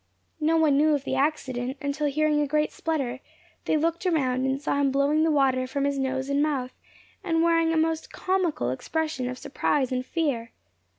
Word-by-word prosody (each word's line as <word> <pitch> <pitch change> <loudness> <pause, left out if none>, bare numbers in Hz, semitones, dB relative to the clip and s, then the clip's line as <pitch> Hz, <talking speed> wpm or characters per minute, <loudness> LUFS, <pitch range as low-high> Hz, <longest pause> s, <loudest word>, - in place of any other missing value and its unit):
No 320 +2 +2
one 305 -3 +4
knew 305 +1 +4
of 280 - -3
the - - -3
accident, 265 -3 -1
until 290 0 -1
hearing 300 +1 +1
a 295 - 0
great 300 +1 +1
splutter, 275 -6 -2 0.5
they - - +2
looked 330 +3 -1
around, 260 -6 +1
and 265 +1 0
saw 285 0 -1
him 275 - +3
blowing 280 +3 +2
the 325 - +3
water 265 -4 +2
from 275 +2 -2
his 280 -1 0
nose 265 0 -1
and 280 +1 +1
mouth, 275 -4 -1 0.5
and 330 -3 +1
wearing 330 -1 +3
a 325 - +1
most 320 0 0
comical 355 - 0
expression 300 - -2
of 255 - -5
surprise 275 -1 -1
and 255 0 -1
fear. 255 -7 -2
285 Hz, 190 wpm, -26 LUFS, 265-315 Hz, 0.5 s, one